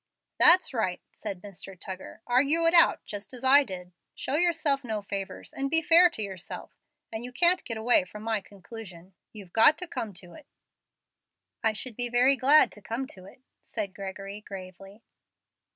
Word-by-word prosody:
"That's 360 -4 +7
right," 190 -7 -1
said 195 -4 -7
Mr. 195 -2 -10
Tuggar; 190 +2 -9
"argue 285 +7 +3
it 330 - +3
out, 335 - +4
just 205 +3 -7
as 250 - -9
I 280 +2 +6
did. 180 -6 -9 0.2
Show - - -4
yourself 305 -4 +2
no 220 -4 -4
favors, 195 -1 -6
and 275 0 -2
be 320 +2 +4
fair 345 +2 +6
to 220 -11 -5
yourself, 190 -3 -8 0.4
and 220 +1 -4
you 250 - -6
can't 350 +7 +3
get 230 - -5
away 220 -3 +3
from 210 +3 -11
my 220 -2 -1
conclusion. 195 -2 -12 0.2
You've 200 -5 -12
got 260 +7 +5
to 360 - -6
come 225 -9 -5
to 175 -1 -10
it." 305 - -15 1.2
"I 220 -1 +2
should 230 +2 -4
be 245 +1 -1
very 250 +3 +4
glad 280 +4 +4
to 210 - -13
come 230 +6 -4
to 185 -1 -14
it," 250 +6 -17 0.2
said 205 -4 -5
Gregory, 195 +1 -7
gravely. 195 +1 -11
220 Hz, 180 wpm, -27 LUFS, 195-270 Hz, 1.2 s, That's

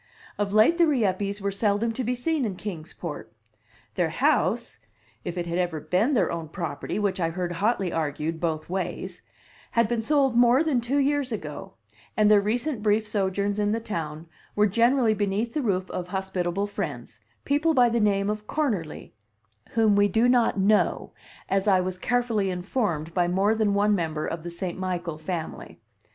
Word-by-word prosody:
Of 205 -1 0
late 220 - +4
the 340 - +6
Rieppes 205 -7 0
were 200 0 -1
seldom 205 +3 +1
to 255 +3 -3
be 250 +2 -1
seen 305 +3 -1
in 205 -5 -2
Kings 175 -5 -7
Port. 160 -4 -7 0.6
Their - - 0
house 105 0 +1 0.4
(if 175 +1 -5
it 175 - -2
had 170 +1 -2
ever 175 -3 -1
been 215 - +1
their 190 -7 +2
own 165 -2 -5
property, 165 -2 -4
which 200 -2 0
I 165 -2 +1
heard 175 +1 -3
hotly 195 +1 0
argued 160 +1 -2
both 160 -2 -2
ways) 185 -1 -4 0.5
had 230 -1 +2
been 235 0 -1
sold 270 0 +2
more 245 +4 +5
than 285 -7 +1
two 250 +5 -1
years 285 -2 +1
ago, 155 -9 -6 0.4
and 210 -1 +5
their 205 -1 +6
recent 240 +4 -1
brief 215 +1 +2
sojourns 200 0 -1
in 205 0 +1
the 225 - 0
town 165 -7 -5 0.3
were 210 - +4
generally 235 +3 +3
beneath 210 +2 -1
the 305 - 0
roof 190 -6 0
of 180 - -4
hospitable 190 0 -2
friends 150 - -6 0.3
people 305 +3 +2
by 250 -2 +6
the 235 0 +1
name 200 -2 +2
of 210 0 -3
Cornerly, 215 - -2 0.6
"whom 220 -3 +4
we 205 0 +4
do 220 +5 +2
not 245 -4 +3
know," 205 +2 +2 0.4
as 195 +1 0
I 190 -2 +5
was 185 0 -3
carefully 230 -5 0
informed 180 - -2
by 175 -1 +2
more 195 +4 +2
than 215 -2 +1
one 205 +1 +3
member 160 -5 -1
of 165 - -4
the 175 - -6
St. 175 +1 -5
Michael 175 -4 -3
family. 160 +1 -6
200 Hz, 180 wpm, -26 LUFS, 175-230 Hz, 0.6 s, the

